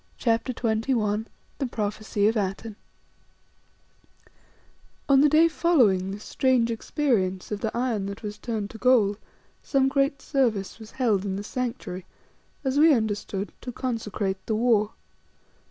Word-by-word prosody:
CHAPTER 230 +1 +1
XXI 220 -2 0 0.3
THE 270 - 0
PROPHECY 210 -2 -1
OF 225 - +2
ATENE 205 +1 -3 2.3
On 275 -1 +6
the 295 - +5
day 315 +3 +6
following 250 - +3
this 205 +2 -6
strange 255 -3 +2
experience 220 - -1
of 210 - -2
the 220 - -1
iron 235 -5 -1
that 200 +2 -7
was 210 0 -6
turned 215 -4 -3
to 225 - -11
gold 220 -5 +3 0.4
some 270 -2 +2
great 275 +1 +1
service 230 -8 -1
was 220 -1 -11
held 225 -7 +1
in 195 -2 -2
the 200 - -4
Sanctuary, 225 -6 -4 0.6
as 265 +1 +1
we 310 -1 +7
understood, 205 -3 -2
"to 250 - -6
consecrate 210 -6 -3
the 220 - 0
war." 220 -2 +2
225 Hz, 140 wpm, -26 LUFS, 205-255 Hz, 2.3 s, we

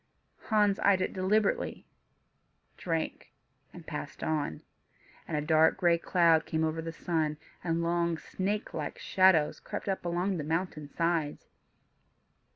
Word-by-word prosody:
Hans 210 -2 +3
eyed 200 -2 +4
it 185 - -1
deliberately, 195 +2 0 0.9
drank, 165 -4 -3 0.4
and 175 -2 -12
passed 150 -2 -6
on. 150 - -2 0.6
And 155 - -2
a - - 0
dark 155 +1 +4
gray 175 -2 +3
cloud 165 -3 +3
came 160 0 0
over 160 +1 -1
the 165 0 -5
sun, 160 -2 -1 0.3
and 170 -1 0
long, 170 0 +1
snake 200 +6 -3
like 150 -2 -4
shadows 185 -6 +3
crept - - -6
up 195 -1 -1
along 175 +2 -1
the 155 - -3
mountain 160 -1 -2
sides. 165 -2 -1
170 Hz, 135 wpm, -30 LUFS, 160-185 Hz, 0.9 s, eyed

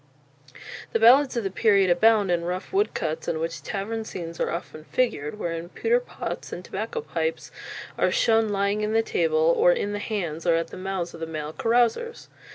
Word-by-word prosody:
The 225 - +2
ballads 255 +3 +6
of 235 - 0
the 195 - -2
period 200 -3 +3
abound 205 +1 +4
in 170 -1 +1
rough 180 - -4
woodcuts 165 - -1
in 160 - 0
which 165 +1 -4
tavern 220 +3 -4
scenes 170 -5 -7
are - - 0
often 160 -2 -6
figured, 210 - -1
wherein 170 -3 -4
pewter 470 - +1
pots - - -6
and - - -7
tobacco 470 -1 -4
pipes 480 +2 -3 0.5
are - - +3
shown 225 -1 +3
lying 200 +1 0
on 210 +1 -1
the 225 0 +3
table 475 - +2
or - - +5
in 205 - -1
the 205 - -3
hands 180 -7 -3
or 170 - +5
at 165 0 -1
the - - -9
mouths 185 -2 -3
of - - -10
the 165 - -4
male 155 -1 -5
carousers. 240 - 0
205 Hz, 190 wpm, -25 LUFS, 170-235 Hz, 0.5 s, ballads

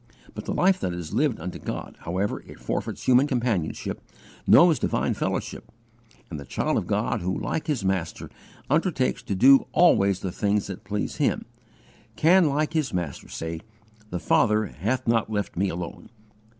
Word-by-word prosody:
But 105 - -7
the - - -3
life 185 +1 +3
that 90 - -2
is 85 -3 -6
lived 145 -5 +1
unto 90 +3 -6
God, - - -6
however 95 +4 -2
it - - -12
forfeits - - -4
human 130 +3 +4
companionship, 120 - -2 0.5
knows 165 -6 +7
divine - - 0
fellowship, - - -4 0.6
and 80 - -5
the - - -7
child - - -1
of - - -2
God - - 0
who 95 +2 -1
like 160 - -3
his 135 -10 -1
Master 95 -4 -2 0.4
undertakes 150 -3 +1
to 100 - -3
"do 135 +7 +6
always 100 - +4
the 95 - -3
things 100 +2 0
that 95 -2 -7
please 105 +1 -3
Him," - - 0 0.7
can 170 0 +5
like 150 +3 0
his 155 -5 0
Master 85 -6 -4
say, 80 0 -5 0.5
"The 90 - -3
Father 105 +5 +3
hath 110 - -3
not 115 -1 +2
left 105 -3 -2
me 95 +2 +1
alone." 85 0 -6
105 Hz, 165 wpm, -25 LUFS, 90-140 Hz, 0.7 s, knows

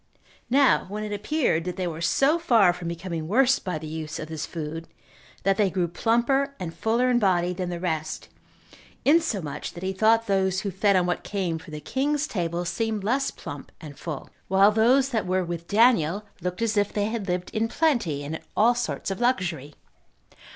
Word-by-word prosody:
Now 270 -4 +4
when 210 +1 -4
it 210 -1 -4
appeared 210 - 0
that 180 -1 -3
they 185 - -2
were 165 -2 -4
so 280 - +3
far 225 - +4
from 175 -1 -7
becoming 170 -1 -4
worse 260 +7 +4
by 180 -4 -3
the 155 - -8
use 155 0 -5
of 155 - -6
this 160 -1 -4
food, 165 0 -6 0.6
that 195 0 +2
they 205 -3 +3
grew 180 -1 0
plumper 240 - +1
and 170 -3 -5
fuller 235 +6 +1
in 240 - +3
body 180 -4 +2
than 180 0 -3
the 175 -1 -4
rest, 160 -3 -3 0.8
insomuch 210 - +1
that 175 - -9
he 190 0 -1
thought 225 +3 +3
those 190 -2 +1
who 200 - -3
fed 200 +2 +2
on 180 -1 +3
what 175 0 -1
came 180 -5 -2
from 160 - -12
the 150 - -5
king's 280 - -1
table 175 - -2
seemed 220 +2 -2
less 265 +6 +1
plump - - -9
and 150 -4 -10
full, 155 -5 -6 0.2
while 195 +2 +5
those 250 +5 +4
that 225 -7 -1
were 185 0 +1
with 170 0 -5
Daniel 210 -4 +3 0.2
looked 180 +5 -3
as 220 -2 0
if 205 0 +2
they 205 -1 0
had 220 -2 -3
lived 180 0 -2
in 225 +1 0
plenty, 230 - 0
and 145 +2 -5
in - - -19 0.2
all 230 +3 +5
sorts 240 -4 -3
of 195 - -4
luxury. 175 - -1
190 Hz, 200 wpm, -25 LUFS, 170-230 Hz, 0.8 s, while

